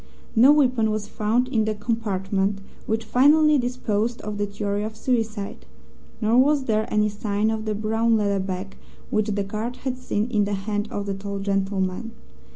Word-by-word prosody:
No 250 +5 +7
weapon 255 -7 +3
was 215 -1 -2
found 225 +4 0
in 220 -4 +1
the 215 0 -1
compartment 200 -3 -1 0.3
(which 220 +1 -1
finally 295 +5 +5
disposed 240 -2 -1
of 210 -1 -5
the 205 - 0
theory 205 0 -2
of 215 +1 -4
suicide), 225 -4 -2 0.6
nor 225 +2 +3
was 285 +1 +4
there 220 -3 0
any 210 0 +3
sign 210 +1 -1
of 220 0 -3
the 215 -1 -1
brown 225 +2 +1
leather 200 -2 +1
bag 190 +1 -4 0.4
which 215 0 +1
the 205 -1 0
guard 215 +5 -4
had 255 -1 -2
seen 215 -3 -1
in 210 -3 +2
the 205 0 -1
hand 205 +2 -2
of 205 - -4
the 200 - -2
tall 200 +1 -5
gentleman. 195 +2 -1
215 Hz, 175 wpm, -24 LUFS, 200-230 Hz, 0.6 s, No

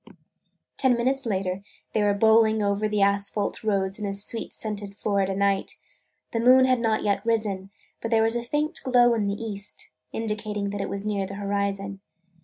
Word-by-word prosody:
Ten 255 -3 +3
minutes 260 +2 0
later 190 -2 -1 0.3
they 215 - +2
were 205 -1 +2
bowling 220 0 +4
over 200 +1 +1
the 210 -1 +2
asphalt 200 +1 0
roads 195 -2 0
in 210 - -3
the 195 - -2
sweet 205 +3 -3
scented 205 -2 -1
Florida 195 -2 0
night. 200 0 +1 0.6
The 230 - -1
moon 255 +2 +6
had 255 -1 +3
not 225 -2 0
yet 200 -1 0
risen, 210 -4 -1 0.3
but 230 - -3
there 225 -1 +3
was 225 +1 +1
a 240 - 0
faint 295 +7 -2
glow 245 -2 +4
in 215 -3 0
the 200 +1 -2
east, 210 -3 -7 0.2
indicating 210 -2 -3
that 205 0 -3
it 195 - -3
was 200 +1 -4
near 200 -2 -1
the 195 - -7
horizon. 200 -1 -2
210 Hz, 185 wpm, -25 LUFS, 200-225 Hz, 0.6 s, moon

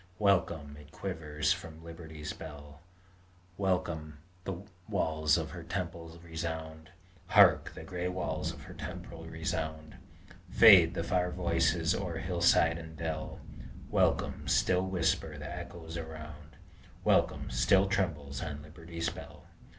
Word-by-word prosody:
Welcome! 85 -8 +1
it 75 0 -15
quivers 80 -4 -1
from 80 -3 -9
Liberty's 80 -2 -7
bell; 75 -1 -10 0.7
Welcome! 85 -6 -1 0.3
the 95 -1 -4 0.3
walls 80 -6 +2
of 80 -2 -3
her 85 +1 -7
temple 85 -1 -5
resound! 80 -1 -5 0.4
Hark! - - +6
the - - -8
gray 90 -1 -3
walls 90 0 -2
of - - -11
her - - -10
temple - - -7
resound! 80 -1 -4 0.5
Fade 90 -7 +8
the 85 - -1
far 90 +1 +1
voices 85 -2 +1
o'er 90 -4 -3
hillside 85 -1 +3
and 80 -1 -10
dell; 80 -2 -4 0.5
Welcome! - - +1
still 90 0 +3
whisper 90 -3 0
the - - -6
echoes 80 -1 -7
around; 75 -2 -8 0.5
Welcome! - - +2
still 95 +10 +4
trembles 80 -8 -1
on 75 -1 -5
Liberty's 85 +1 -4
bell! - - -11
80 Hz, 125 wpm, -31 LUFS, 80-90 Hz, 0.7 s, Fade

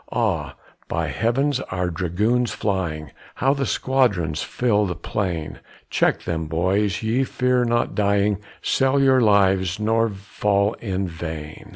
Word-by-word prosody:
Ah! - - -1 0.3
by - - -2
heavens, 130 +4 0
our 90 -1 -1
dragoons 105 +9 0
flying, 85 - -2 0.2
How 135 +1 +2
the 140 -2 -2
squadrons 100 - +1
fill 105 -4 +1
the 90 - -3
plain! 85 -2 -3 0.3
Check - - +1
them, 80 -2 -3
boys, 95 +6 0
ye 115 +4 +1
fear 125 -1 +1
not 120 0 0
dying, 100 -1 +1 0.2
Sell 135 +1 +2
your 135 -1 +4
lives, 95 -3 +3
nor 115 +1 +2
fall 100 +1 0
in 95 -3 -2
vain. 80 -2 -7
100 Hz, 135 wpm, -22 LUFS, 90-120 Hz, 0.3 s, your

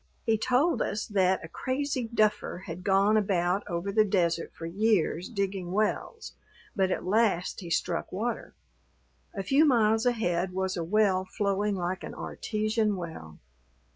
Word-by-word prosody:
He 225 -2 +3
told 255 +9 +2
us 210 +2 -1
that 190 -4 +1
a - - -8
crazy 260 - -2
duffer 215 -4 0
had 170 +1 -7
gone 200 +3 +4
about 190 -2 +1
over 175 +1 -3
the 215 +2 +4
desert 170 -5 0
for 165 - -9
years 185 -1 +1
digging 195 -5 -3
wells, 215 - -2 0.4
but 190 -3 +2
at 185 - -2
last 195 -3 +1
he 175 -4 -8
struck 165 +1 -1
water. 220 +5 -3 0.8
A 195 - -3
few 270 +10 +4
miles 225 -4 +3
ahead 180 -6 0
was 190 0 -1
a 170 - -2
well 190 +1 +2
flowing 200 +1 -1
like 185 +1 -3
an - - -7
artesian 215 -1 -1
well. 160 - -8
200 Hz, 150 wpm, -28 LUFS, 180-220 Hz, 0.8 s, gone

